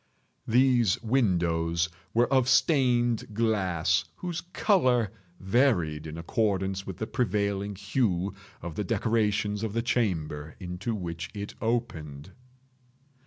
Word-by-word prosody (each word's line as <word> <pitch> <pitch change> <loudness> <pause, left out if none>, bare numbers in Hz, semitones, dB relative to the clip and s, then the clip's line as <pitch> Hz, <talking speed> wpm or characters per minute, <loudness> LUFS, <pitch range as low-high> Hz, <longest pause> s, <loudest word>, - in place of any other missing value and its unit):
These 120 -4 +3
windows 85 -8 +1 0.2
were 120 +3 +3
of 130 -1 +3
stained 120 -5 +2
glass 100 -7 +1
whose 175 -2 -4
color 125 - +2 0.3
varied 95 - +1
in 80 +1 -7
accordance 95 +1 -1
with 95 -3 -6
the 110 - -3
prevailing 100 -4 -1
hue 100 -2 0 0.3
of 85 -1 -5
the 105 - -2
decorations 105 -2 0
of 110 -2 -3
the 115 0 0
chamber 80 - -1
into 90 +4 -4
which 85 -4 -5
it 100 0 -5
opened. 85 - -3
105 Hz, 115 wpm, -28 LUFS, 90-120 Hz, 0.3 s, These